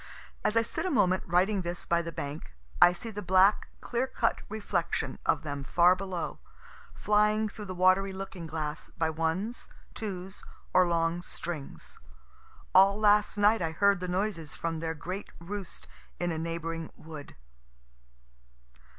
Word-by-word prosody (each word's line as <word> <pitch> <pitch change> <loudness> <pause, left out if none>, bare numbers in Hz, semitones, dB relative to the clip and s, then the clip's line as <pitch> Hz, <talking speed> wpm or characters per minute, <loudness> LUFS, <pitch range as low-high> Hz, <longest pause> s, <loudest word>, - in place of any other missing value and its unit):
As 215 - +2
I 230 - +5
sit 320 +8 -3
a 370 - 0
moment 190 - +3
writing 185 +4 +2
this 175 0 -4
by 170 0 +2
the 170 0 -6
bank, 145 - -6 0.3
I 175 - +9
see 225 +6 -7
the 205 -1 -5
black, 190 +2 +4
clear 245 +2 -1
cut 230 - 0
reflection 200 -5 -2
of - - +2
them 145 -2 -4
far 175 +5 +5
below, 185 -2 -4 0.6
flying 210 +1 +2
through 210 0 -8
the 185 -1 -6
watery 185 +2 +4
looking 190 -3 -7
glass, 155 -1 -4
by 160 -1 +1
ones, 165 +9 -2 0.2
twos, 190 -3 -6 0.3
or 185 -1 +5
long 170 0 +1
strings. 165 -5 -7 0.7
All 195 +2 +6
last 210 0 +4
night 205 0 +4
I 160 -1 -1
heard 200 +2 +3
the 180 - -4
noises 180 -4 -2
from 165 -1 -3
their 160 0 -3
great 185 +6 -6
roost 190 +2 -6 0.3
in 175 0 0
a 160 - -2
neighboring 165 0 -4
wood. 155 -2 -10
180 Hz, 150 wpm, -29 LUFS, 165-205 Hz, 0.7 s, I